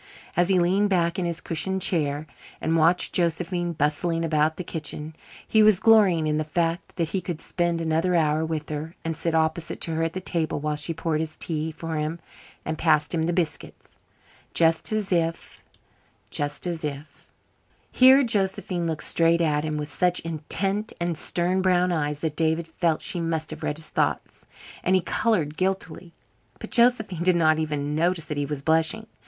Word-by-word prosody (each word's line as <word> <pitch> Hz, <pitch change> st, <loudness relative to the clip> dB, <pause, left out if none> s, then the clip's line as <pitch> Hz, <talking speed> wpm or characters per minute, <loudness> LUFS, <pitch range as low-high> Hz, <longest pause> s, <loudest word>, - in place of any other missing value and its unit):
As 175 Hz, +2 st, +2 dB
he 190 Hz, -, +4 dB
leaned 190 Hz, +4 st, +2 dB
back 170 Hz, -2 st, +1 dB
in 180 Hz, -, -1 dB
his 170 Hz, -1 st, -3 dB
cushioned 190 Hz, +4 st, -1 dB
chair 150 Hz, -3 st, +1 dB, 0.3 s
and 160 Hz, +1 st, 0 dB
watched 165 Hz, +2 st, +3 dB
Josephine 175 Hz, 0 st, 0 dB
bustling 165 Hz, +3 st, 0 dB
about 155 Hz, 0 st, +1 dB
the 180 Hz, -, -4 dB
kitchen, 155 Hz, -1 st, -6 dB, 0.3 s
he 220 Hz, -, +4 dB
was 215 Hz, -3 st, +5 dB
glorying 200 Hz, -8 st, +5 dB
in 150 Hz, 0 st, 0 dB
the 155 Hz, -, 0 dB
fact 165 Hz, +2 st, -2 dB
that 165 Hz, -3 st, -1 dB
he 190 Hz, +2 st, -2 dB
could 175 Hz, -4 st, -5 dB
spend 175 Hz, -1 st, -1 dB
another 165 Hz, +2 st, +1 dB
hour 155 Hz, -1 st, +2 dB
with 160 Hz, -1 st, -3 dB
her, 155 Hz, +2 st, -5 dB
and 165 Hz, 0 st, -2 dB
sit 165 Hz, +1 st, -1 dB
opposite 160 Hz, +1 st, -1 dB
to 165 Hz, -, -1 dB
her 160 Hz, -, -1 dB
at 165 Hz, 0 st, -1 dB
the 185 Hz, -, -3 dB
table 165 Hz, -5 st, -2 dB
while 150 Hz, +1 st, -2 dB
she 150 Hz, +3 st, -3 dB
poured 165 Hz, -1 st, -2 dB
his 155 Hz, 0 st, -4 dB
tea 160 Hz, -1 st, -3 dB
for 160 Hz, 0 st, -5 dB
him 155 Hz, +2 st, -2 dB, 0.5 s
and 160 Hz, 0 st, -3 dB
passed 155 Hz, -2 st, +2 dB
him 160 Hz, -1 st, 0 dB
the -, -, +1 dB
biscuits, 170 Hz, -3 st, -4 dB, 0.6 s
just 165 Hz, +3 st, +3 dB
as 215 Hz, -2 st, -2 dB
if 165 Hz, -2 st, -2 dB, 0.7 s
just 145 Hz, +2 st, -1 dB
as 170 Hz, -3 st, -3 dB
if 145 Hz, 0 st, -7 dB, 0.6 s
Here 260 Hz, +2 st, +7 dB
Josephine 190 Hz, -5 st, 0 dB
looked 160 Hz, -1 st, -3 dB
straight 170 Hz, 0 st, +2 dB
at 150 Hz, -3 st, +1 dB
him 155 Hz, -1 st, -2 dB
with 150 Hz, 0 st, -4 dB
such 180 Hz, -1 st, +1 dB
intent 195 Hz, +6 st, -2 dB
and 170 Hz, -1 st, -1 dB
stern 180 Hz, +4 st, +2 dB
brown 180 Hz, -1 st, +2 dB
eyes 150 Hz, -3 st, -2 dB
that 160 Hz, -2 st, -2 dB
David 160 Hz, 0 st, 0 dB
felt 165 Hz, -1 st, -1 dB
she 175 Hz, -, -1 dB
must 160 Hz, -1 st, -2 dB
have 155 Hz, +1 st, -8 dB
read 150 Hz, -1 st, -2 dB
his 160 Hz, -1 st, -3 dB
thoughts, -, -, -2 dB, 0.4 s
and 185 Hz, -, +3 dB
he 185 Hz, -, +3 dB
colored 170 Hz, -8 st, 0 dB
guiltily. 185 Hz, -2 st, -3 dB, 0.4 s
But -, -, -9 dB
Josephine 235 Hz, -8 st, +2 dB
did 180 Hz, 0 st, +4 dB
not 160 Hz, -2 st, +3 dB
even 150 Hz, -2 st, -2 dB
notice 170 Hz, +1 st, +1 dB
that 150 Hz, -, -5 dB
he 145 Hz, -1 st, -1 dB
was 145 Hz, -1 st, -4 dB
blushing. 160 Hz, +8 st, +1 dB
165 Hz, 185 wpm, -25 LUFS, 155-180 Hz, 0.7 s, Here